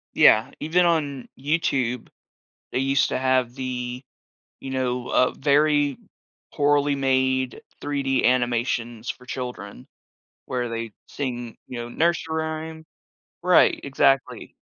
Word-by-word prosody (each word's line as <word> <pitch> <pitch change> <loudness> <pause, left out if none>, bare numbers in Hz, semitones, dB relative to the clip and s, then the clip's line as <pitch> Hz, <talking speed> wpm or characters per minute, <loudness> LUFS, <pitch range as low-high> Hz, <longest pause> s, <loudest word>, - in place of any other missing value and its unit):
Yeah, 110 +1 +5
even 175 +3 +2
on 145 -6 0
YouTube, 130 -5 0 0.6
they 130 - 0
used 135 0 +2
to - - 0
have 130 -2 +1
the, 125 -1 -4 0.6
you 135 - -7
know, 125 -1 -2
uh, 125 - +3
very 145 -1 +2 0.6
poorly 145 0 +3
made 130 -1 +1 0.2
3D 140 -2 0
animations 120 -1 0
for 125 - -9
children, 125 -7 -6 0.6
where 125 -1 -2
they 115 -1 -4 0.2
sing, 120 -4 -5
you 125 -2 -6
know, 120 - -5
nursery 165 +3 0
rhyme 160 0 -6 0.6
right, 180 0 +5
exactly. 135 -1 +1
130 Hz, 115 wpm, -24 LUFS, 125-145 Hz, 0.6 s, Yeah